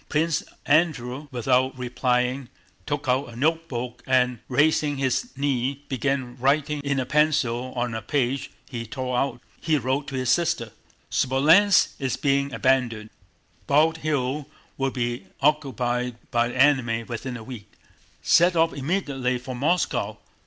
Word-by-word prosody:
Prince 160 +1 +1 0.2
Andrew 145 -3 +1
without 130 +2 +1
replying 125 +1 -1 0.4
took 145 -2 -3
out 130 +2 +2
a 115 - -11
notebook 125 -4 -2
and 125 -2 +2
raising 145 +2 +2
his 135 - -1
knee 135 0 -1
began 130 -2 -1
writing 145 +3 +1
in 140 -2 -1
pencil 130 -4 +1
on 120 -1 -1
a 110 - -3
page 130 +3 -1 0.2
he 120 -3 -5
tore 130 +1 -3
out. 135 0 0 0.2
He 155 -1 +1
wrote 135 +2 -1
to 140 - -5
his 130 -1 +1
sister: 125 -7 0 0.4
"Smolénsk 160 +10 +4
is 135 -3 -1
being 140 -1 +1
abandoned. 120 -5 0 0.6
Bald 155 +3 +3
Hills 145 -2 -1 0.3
will 135 0 0
be 120 -6 -3
occupied 125 -4 0 0.2
by 120 -1 +2
the 125 - -6
enemy 130 -5 +3
within 125 +2 -5
a 115 - -10
week. 110 -4 -10 0.5
Set 175 +1 +4
off 165 0 +3
immediately 140 -5 -1
for 125 +1 -7
Moscow. 165 +8 0
130 Hz, 140 wpm, -24 LUFS, 125-145 Hz, 0.6 s, Smolénsk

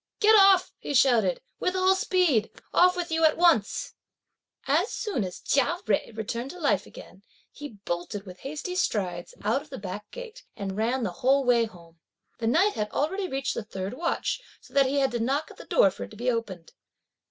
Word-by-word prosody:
"Get 435 0 +6
off," 390 -3 +6
he 285 - -4
shouted, 265 - +3 0.2
"with 365 - -1
all 375 0 +4
speed! 365 - +2 0.2
off 360 +1 +5
with 350 -2 -4
you 325 0 +1
at 310 -1 +4
once!" 330 - +2 0.7
As 325 +9 +2
soon 405 - -2
as 180 -1 -6
Chia 280 +5 +1
Jui 215 +1 -1
returned 235 +4 -4
to 360 - -9
life 240 - +1
again, 190 - -13 0.3
he 290 -4 -9
bolted 175 +4 -4
with 180 -1 -11
hasty 305 +6 -5
strides, 185 - -2
out 220 +7 +1
of 300 - -16
the 270 - -7
back 200 +2 -7
gate, - - -10
and 195 -2 -5
ran 235 +4 0
the 195 - -1
whole 270 +2 +4
way 240 -2 +3
home. 170 -6 -15 0.4
The 225 - -1
night 360 - +3
had 210 0 -2
already 375 - -1
reached 270 -2 -2
the - - -3
third 195 -1 -5
watch, 335 - -2 0.2
so - - -20
that 275 -1 +4
he 280 +2 -1
had 270 -1 +2
to 240 - -2
knock 275 +7 -1
at - - -15
the - - -11
door - - +4
for - - -7
it - - -15
to 215 - -13
be 245 +3 0
opened. 200 -8 -5
265 Hz, 205 wpm, -27 LUFS, 210-350 Hz, 0.7 s, Get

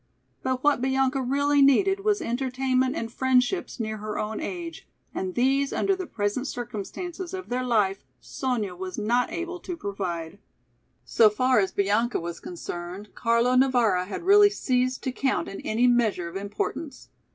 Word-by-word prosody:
But 260 -1 -2
what 290 -4 +3
Bianca 265 0 +1
really 285 +3 +2
needed 380 +9 +4
was 405 -2 +1
entertainment 260 0 0
and 230 0 -4
friendships 260 +6 +1
near 215 -1 -3
her 215 0 -5
own 215 +1 -3
age 340 -2 -6 0.3
and 185 -1 -3
these 270 +3 +2
under 390 - +1
the 370 -2 -6
present 210 +5 -2
circumstances 320 - -5
of 375 - -7
their 250 +1 -1
life, 210 -6 +1 0.2
Sonya 240 -8 -3
was 185 0 -6
not 240 +4 +1
able 350 +1 -4
to 350 0 -6
provide. 190 - -4 0.7
So 220 -2 +5
far 255 +3 +2
as 190 -2 +1
Bianca 210 +5 +1
was 170 0 -6
concerned, 175 +3 -7
Carlo 235 +1 +2
Navara 240 -8 +3
had 205 - -5
really 410 +2 +7
ceased 255 -9 0
to 260 - -1
count 265 +1 -1
in 195 - -7
any 230 +3 +1
measure 230 -8 +2
of 170 - -9
importance. 210 +8 -4
250 Hz, 160 wpm, -26 LUFS, 210-275 Hz, 0.7 s, really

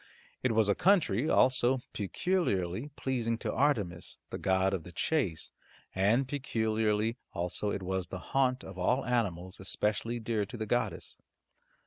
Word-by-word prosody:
It 130 -3 +1
was 110 -1 +3
a 100 - +4
country 155 - +3
also 130 0 +3
peculiarly 105 - -1
pleasing 120 -3 -1
to - - -3
Artemis, 105 -12 0
the - - -4
goddess 95 0 +2
of 80 - -13
the 90 - -10
chase, 100 - -1 0.4
and 110 +8 +3
peculiarly 110 -4 0 0.2
also 90 +3 -2
it 100 -1 -3
was 95 0 -2
the 95 - -5 0.2
haunt 130 -1 +2
of 95 -1 -9
all 125 +9 +2
animals 95 -7 -1
especially 105 +5 -1
dear 110 -2 0
to 100 - -7
the 110 - -3
goddess. 110 -4 -2
110 Hz, 145 wpm, -31 LUFS, 95-125 Hz, 0.4 s, a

